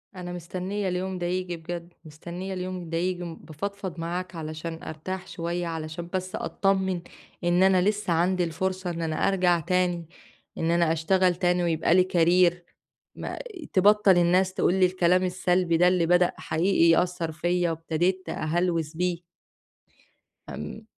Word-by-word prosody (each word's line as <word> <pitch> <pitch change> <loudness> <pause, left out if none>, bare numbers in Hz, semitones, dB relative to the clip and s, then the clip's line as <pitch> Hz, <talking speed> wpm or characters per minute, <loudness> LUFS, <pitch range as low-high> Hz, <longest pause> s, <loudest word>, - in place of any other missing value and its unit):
أنا 180 -1 -6
مستنية 185 +3 -4
اليوم 185 +1 -2
ده 175 - -3
ييجي 180 0 -2
بجد، 170 +1 -7
مستنية 175 +5 -7
اليوم 185 -2 -5
ده 165 - -1
ييجي، 180 +1 -1
بافضفض 175 +2 -6
معاك 175 +2 -4
علشان 160 +1 -6
أرتاح 180 +4 -6
شوية، 170 +1 -3
علشان 165 +1 -5
بس 185 0 -3
أتطمِّن 190 -2 0 0.4
إن 175 +1 +3
أنا 190 -1 +5
لسه 210 -2 +1
عندي 180 +2 +2
الفرصة 185 +2 -2
إن 170 -1 -4
أنا 160 -1 -2
أرجع 180 -3 +3
تاني، 175 0 0 0.5
إن 165 +1 0
أنا 170 -1 +3
أشتغل 180 +3 +2
تاني 180 0 +1
ويبقى 165 -1 +2
لي 185 +1 +4
career، 175 +1 +5 0.6
ما - - -6 0.3
تبطَّل 200 0 +5
الناس 180 +2 +3
تقول 180 - +2
لي 190 -1 +4
الكلام 180 0 +2
السلبي 180 -1 +1
ده 180 +2 +5
اللي 180 -2 +3
بدأ 180 +1 +4
حقيقي 170 +1 +2
يأثّر 170 0 +1
فيّا 175 +2 0
وابتديت 170 +3 -1
أهلوس 165 -1 -1
بيه. 175 0 -1 1.3
آمم، 220 - -7
175 Hz, 145 wpm, -26 LUFS, 170-185 Hz, 1.3 s, أنا